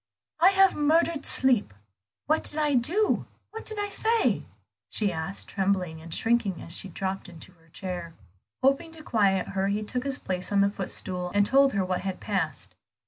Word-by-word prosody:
"I 350 +3 +7
have 385 -1 +5
murdered 315 +1 +2
sleep. 240 - +3 0.5
What 310 +2 +1
did 295 - -2
I 300 -1 +1
do? 335 - +2 0.2
what 445 - -7
did 435 - -5
I 410 - -1
say?" 450 +3 +1 0.4
she 205 -3 +1
asked, 160 +4 -5
trembling 185 -5 -1
and 165 +1 -11
shrinking 225 -2 0
as 165 - -2
she 195 - -1
dropped 190 +1 -4
into 170 +1 -10
her 165 -2 -26
chair. 175 -1 -6 0.5
Hoping 275 +5 +2
to 320 -1 -9
quiet 195 -7 +1
her, 195 0 -1
he 205 +2 -1
took 250 +4 -2
his 275 -1 -2
place 185 0 -4
on 200 -1 +3
the 200 0 +3
footstool, 180 -2 -2
and 205 0 +4
told 275 +4 +4
her 195 -2 0
what 185 -1 -2
had 190 -1 -4
passed. 170 -9 -3
200 Hz, 185 wpm, -27 LUFS, 185-285 Hz, 0.5 s, I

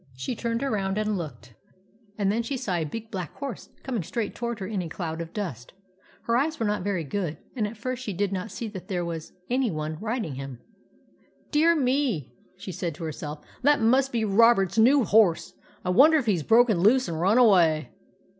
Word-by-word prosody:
She 130 - -4
turned 230 +2 -2
around 200 -7 -1
and 215 0 0
looked, 125 -9 -7 0.6
and 200 -2 +1
then 225 +3 0
she 260 +4 -3
saw 200 -6 -3
a 170 -2 0
big 220 +8 -7
black 180 -5 -5
horse 275 -6 -6
coming 245 -6 -2
straight 200 +5 -3
toward 235 -1 -4
her 190 - -4
in 200 -1 -2
a 170 - -5
cloud 165 -1 -4
of 165 0 -7
dust. 165 - -5 0.5
Her 230 - +1
eyes 310 +6 0
were 225 - 0
not 210 -1 0
very 185 -3 -1
good, 160 0 -3 0.2
and 220 -4 0
at 215 +2 -9
first 255 +3 -4
she 225 - -4
did 200 +1 -1
not 190 +3 -3
see 230 - -5
that 190 -4 -9
there 180 -4 -2
was 165 -2 -5 0.2
any 255 0 +1
one 155 -2 -4
riding 220 - -2
him. 135 -2 -7 0.5
" - - -35
Dear 325 +3 +4
me! 255 - 0
" 185 - -35
she 190 0 -7
said 175 -3 -4
to 165 - -8
herself. 150 -1 -6
" - - -26
That 290 +2 +4
must 260 +4 +3
be 230 -2 0
Robert's 205 -2 +4
new 260 +4 +6
horse. 205 -5 +3 0.3
I 180 - +1
wonder 305 - +6
if 280 - -1
he 210 -4 +3
's 165 - -2
broken 225 - +4
loose 245 +8 +4
and 165 -1 -3
run 200 +6 +3
away." 170 - +4
205 Hz, 220 wpm, -26 LUFS, 170-235 Hz, 0.6 s, new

